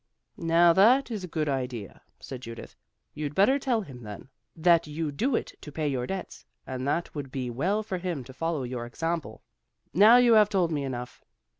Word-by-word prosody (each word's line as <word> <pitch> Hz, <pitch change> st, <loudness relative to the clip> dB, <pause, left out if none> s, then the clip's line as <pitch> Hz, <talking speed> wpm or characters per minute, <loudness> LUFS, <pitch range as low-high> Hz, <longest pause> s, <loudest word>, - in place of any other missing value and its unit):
"Now 170 Hz, +1 st, +5 dB
that 240 Hz, +8 st, +5 dB
is 210 Hz, -4 st, -4 dB
a -, -, -5 dB
good 155 Hz, -2 st, -2 dB
idea," 125 Hz, -7 st, -4 dB, 0.2 s
said 130 Hz, -2 st, -8 dB
Judith. 115 Hz, -2 st, -9 dB, 0.4 s
"You'd 150 Hz, -1 st, -5 dB
better 260 Hz, +9 st, +4 dB
tell 245 Hz, -4 st, 0 dB
him 135 Hz, -10 st, -10 dB
then, 105 Hz, +3 st, -9 dB, 0.3 s
that 170 Hz, -1 st, +3 dB
you 150 Hz, 0 st, -3 dB
do 235 Hz, -, 0 dB
it -, -, -3 dB
to 150 Hz, -, -9 dB
pay 155 Hz, +1 st, -2 dB
your 130 Hz, -3 st, -2 dB
debts, 190 Hz, -1 st, -6 dB, 0.2 s
and 130 Hz, 0 st, -4 dB
that 170 Hz, +4 st, 0 dB
it -, -, -35 dB
would 140 Hz, -3 st, -6 dB
be 130 Hz, -2 st, -3 dB
well 190 Hz, -, 0 dB
for 190 Hz, -4 st, -4 dB
him 175 Hz, -7 st, -3 dB
to 130 Hz, -, -12 dB
follow 160 Hz, 0 st, -2 dB
your 120 Hz, -1 st, -5 dB
example. 165 Hz, -4 st, -4 dB, 0.5 s
Now 210 Hz, -, +8 dB
you 245 Hz, -2 st, +5 dB
have 210 Hz, -2 st, +6 dB
told 185 Hz, -5 st, +1 dB
me 145 Hz, -3 st, -1 dB
enough. 125 Hz, -2 st, -6 dB
160 Hz, 200 wpm, -27 LUFS, 130-190 Hz, 0.5 s, Now